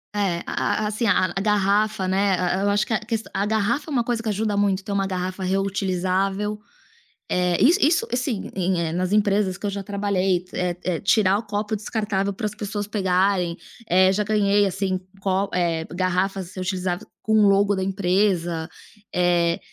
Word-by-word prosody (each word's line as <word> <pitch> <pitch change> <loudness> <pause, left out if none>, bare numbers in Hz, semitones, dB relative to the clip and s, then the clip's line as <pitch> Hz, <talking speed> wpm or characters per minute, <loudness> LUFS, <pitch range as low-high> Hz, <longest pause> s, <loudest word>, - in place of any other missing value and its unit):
É, 190 -5 0
a 215 - -1
a 210 - 0
assim 220 +2 -1
a 185 -3 +2
a 195 - -1
garrafa, 210 0 +1
né, 190 0 +2
a 180 0 0
e 195 - -1
eu - - +2
acho 205 +1 +2
que - - -3
a 220 - +2 0.3
a 200 - 0
garrafa 220 +8 0
é - - -6
uma 245 -4 +1
coisa 230 -1 -1
que 225 - -3
ajuda 210 0 -1
muito 200 -1 +1
ter 205 - -6
uma 195 -1 0
garrafa 185 0 -3
reutilizável, 195 +1 -1 0.7
eh, 180 -1 +2
isso 340 +8 +5
isso 335 +10 +3
assim, 245 -4 -2
e 190 - -3
em, 185 -1 +1
eh, - - -4
nas 180 +2 -1
empresas 205 -2 +2
que - - -15
eu 205 - 0
já 200 0 -4
trabalhei, 195 -3 0
eh 180 -1 -1
eh, 175 -3 -1
tirar 200 -1 +3
o - - -4
copo 210 +1 -2
descartável 205 -2 -2
para 220 - -6
as 210 -1 -2
pessoas 205 -1 -4
pegarem, 190 -3 +1 0.3
eh, 185 +2 +5
já 210 +2 +1
ganhei, 205 -1 +2
assim, 190 0 -1 0.2
co 195 0 0
eh, 165 -2 0
garrafas 185 0 -1
reutilizáveis 185 -1 -3
com 220 -1 +4
logo 200 +1 +4
da 190 - -2
empresa, 185 -3 0 0.5
eh, 175 -1 +2
195 Hz, 190 wpm, -23 LUFS, 185-210 Hz, 0.7 s, isso